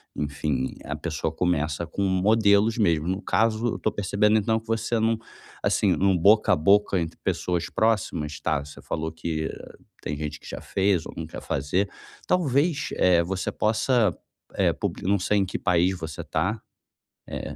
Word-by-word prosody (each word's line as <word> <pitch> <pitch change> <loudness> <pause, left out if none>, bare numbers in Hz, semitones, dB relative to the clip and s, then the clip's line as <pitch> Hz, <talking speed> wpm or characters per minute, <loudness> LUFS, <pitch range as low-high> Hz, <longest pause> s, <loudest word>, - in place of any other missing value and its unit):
enfim, 70 -2 -2
a 75 - -3
pessoa 80 0 -3
começa 80 -2 0
com 100 +3 -3
modelos 100 +3 +3
mesmo. 85 -7 +2
No 95 +2 -1
caso, 115 +1 +1
eu - - -2
estou 110 - -1
percebendo, 105 +2 +2
então, 110 +2 +1
que 115 - -21
você 115 +1 0
não 115 0 +2 0.5
assim, - - +2
no 95 0 +3
boca 105 +5 +5
a - - +5
boca 100 +3 +3
entre 80 -1 -4
pessoas 90 -2 -1
próximas 95 -9 0
tá, 75 -3 0
você 75 - -12
falou 80 +1 -3
que 80 -1 -3 0.5
tem 75 - -3
gente 75 0 -5
que - - -14
já - - -6
fez 95 -4 +1
ou - - -9
não 80 - -4
quer - - -8
fazer. 90 +9 -1 0.4
Talvez, 145 -2 +1
eh, 90 -2 +4
você 95 +2 -3
possa, 110 -1 +2 0.4
eh, - - +2
puli - - -2
não 100 +2 +2
sei 105 +3 +1
em 95 - +2
que 90 - -4
país 90 0 +2
você 80 -2 -6
está. - - -2 0.7
Eh - - -6
95 Hz, 175 wpm, -25 LUFS, 80-110 Hz, 0.7 s, boca